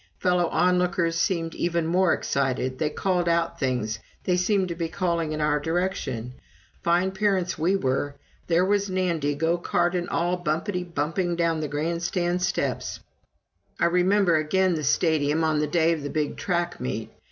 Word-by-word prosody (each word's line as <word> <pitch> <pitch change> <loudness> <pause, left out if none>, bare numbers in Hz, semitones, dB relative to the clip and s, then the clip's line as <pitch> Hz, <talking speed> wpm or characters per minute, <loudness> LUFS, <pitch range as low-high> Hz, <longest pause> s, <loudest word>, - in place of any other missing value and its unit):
Fellow 180 -1 +2
onlookers 180 -1 +1
seemed 165 -1 0
even 170 -1 -1
more 180 +2 +3
excited 130 -1 -1
they 155 - +1
called 180 +2 0
out 170 0 0
things 125 -5 -1 0.2
they 180 - +1
seemed 185 +1 +1
to - - -2
be 165 -1 -2
calling 170 -3 -1
in 155 - -3
our 150 -1 +2
direction. 145 -8 -2 0.5
Fine 175 +3 +2
parents 190 -2 0
we 175 +5 +2
were 140 -3 -1 0.3
there 175 +1 +3
was 200 0 +1
Nandy, 170 -6 0
go 165 +3 +1
cart 175 +1 +1
and 175 -1 -2
all, 175 +2 0
bumpety 175 +4 -1
bumping 170 +4 -1
down 165 -1 +1
the 155 - -2
grandstand 170 +4 -1
steps. 185 - -1 0.8
I - - +3
remember 180 0 +3
again 185 +4 +2
the 155 -2 -2
Stadium 155 +1 +2
on 155 -1 +2
the 150 - +1
day 165 +1 +3
of 160 - -4
the 145 - -4
big 150 -1 -1
track 175 -1 -2
meet. 65 - -4
170 Hz, 165 wpm, -25 LUFS, 155-180 Hz, 0.8 s, more